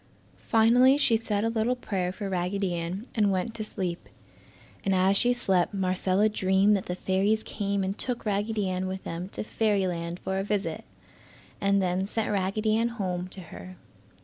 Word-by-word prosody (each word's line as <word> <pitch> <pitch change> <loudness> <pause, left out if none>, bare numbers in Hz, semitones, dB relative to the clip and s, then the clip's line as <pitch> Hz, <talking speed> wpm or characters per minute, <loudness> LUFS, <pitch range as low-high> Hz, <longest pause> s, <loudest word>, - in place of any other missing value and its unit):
Finally 245 +4 +5
she 265 -5 +4
said 215 -2 -1
a 225 - +1
little 230 +2 +1
prayer 190 -7 -2
for 200 +2 -5
Raggedy 185 0 -1
Ann, 175 +5 -4
and 210 -3 +2
went 190 +4 -1
to 225 -1 -4
sleep. 185 -5 -4 0.7
And 195 -1 +1
as 190 +2 +3
she 245 +4 +3
slept 195 -6 +1
Marcella 190 +2 +2
dreamed 195 0 +3
that 195 - -3
the 180 - -2
fairies 195 +4 +1
came 200 -1 -2
and 190 +1 -2
took 245 +1 -4
Raggedy 210 0 0
Ann 185 0 -2
with 190 0 -5
them 170 +3 -5
to - - -5
fairyland 185 -6 -1
for 190 0 -2
a - - -1
visit, 205 0 -2 0.8
and 200 0 +3
then 185 +1 0
sent 220 +1 -2
Raggedy 210 +2 +1
Ann 230 +1 +2
home 185 -6 -3
to 185 +1 -3
her. 185 0 -10
195 Hz, 175 wpm, -27 LUFS, 185-215 Hz, 0.8 s, Finally